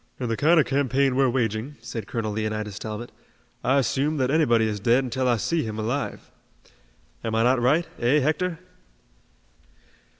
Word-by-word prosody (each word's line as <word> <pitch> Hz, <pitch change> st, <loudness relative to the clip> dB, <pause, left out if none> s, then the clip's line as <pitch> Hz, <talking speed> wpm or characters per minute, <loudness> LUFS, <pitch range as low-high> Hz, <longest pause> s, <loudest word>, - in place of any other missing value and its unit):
"In 125 Hz, -2 st, -3 dB
the 115 Hz, -, 0 dB
kind 160 Hz, +7 st, +4 dB
of 150 Hz, -, +4 dB
campaign 135 Hz, -1 st, +1 dB
we're 135 Hz, -1 st, +3 dB
waging," 120 Hz, +2 st, -1 dB
said 115 Hz, -1 st, -6 dB
Colonel 115 Hz, -3 st, -3 dB
Leonidas 110 Hz, -1 st, -3 dB
Talbot, 110 Hz, +2 st, -6 dB, 0.5 s
"I 135 Hz, +2 st, +3 dB
assume 140 Hz, +4 st, 0 dB
that 130 Hz, -1 st, +1 dB
anybody 120 Hz, -8 st, +3 dB
is 105 Hz, -1 st, -3 dB
dead 120 Hz, +5 st, +3 dB
until 130 Hz, +1 st, -1 dB
I 120 Hz, -1 st, +3 dB
see 165 Hz, +9 st, 0 dB
him 110 Hz, -4 st, -5 dB
alive. 120 Hz, +6 st, -3 dB, 0.9 s
Am 110 Hz, -1 st, -2 dB
I 115 Hz, -, +3 dB
not 125 Hz, +1 st, +3 dB
right, 150 Hz, +8 st, +2 dB
eh, 125 Hz, +5 st, +3 dB
Hector?" 160 Hz, +4 st, 0 dB
125 Hz, 165 wpm, -24 LUFS, 110-140 Hz, 0.9 s, kind